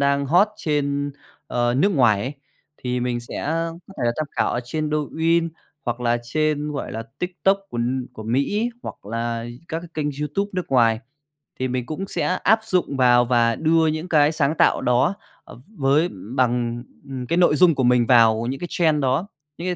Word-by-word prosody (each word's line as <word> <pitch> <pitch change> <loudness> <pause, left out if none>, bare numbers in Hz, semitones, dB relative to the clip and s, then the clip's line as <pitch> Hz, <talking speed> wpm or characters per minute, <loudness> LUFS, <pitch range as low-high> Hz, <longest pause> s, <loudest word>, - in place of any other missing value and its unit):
đang 140 0 +2
hot 180 +9 +4
trên, 145 -2 -1 0.4
ờ, 120 0 0
nước 195 +10 +3
ngoài 120 -8 +4
ấy. 130 - -3 0.4
Thì 125 0 -3
mình 120 -1 -1
sẽ 120 - -6
có 165 +2 -2 0.2
thể - - -1
là 120 - +2
tham 155 - -2
khảo - - 0
ở 120 - -1
trên 155 +4 -3
Douyin 160 +3 +1 0.4
hoặc 120 0 -3
là 120 0 +1
trên, 150 +3 -1
gọi 140 - -5
là, 115 - -4 0.2
TikTok 190 +2 +1
của 120 - -5 0.3
của 110 - -9
Mỹ 135 - 0
ấy, 240 +2 0
hoặc - - -9
là 115 +1 -3 0.2
các 160 - -2
cái 175 - -11
kênh 155 -2 -1
YouTube 175 +8 -2
nước 180 -1 -2
ngoài. 115 -4 +3 0.6
Thì 130 - 0
mình 125 -1 -2
cũng 190 +5 -4
sẽ - - -2 0.2
áp 220 +3 +5
dụng 180 -9 0
vào 125 -1 +5
và 120 -1 +2
đưa 160 0 +3
những 155 +3 -2
cái 150 -2 +4
sáng 150 -1 +1
tạo - - +3
đó, 125 +9 +2 0.3
à, - - -12 0.2
v - - -15
với 145 +5 +3 0.3
bằng, 120 -2 0 0.3
ừ, - - -12 0.2
cái 170 - +1
nội 175 -4 +4
dung 170 -1 +5
của 135 - 0
mình 120 -1 +4
vào 115 -2 +5
những 135 +2 -3
cái 175 - -3
trend 155 -4 +2
đó, 135 +9 0 0.3
những 175 +2 -3
140 Hz, 200 wpm, -22 LUFS, 120-160 Hz, 0.6 s, áp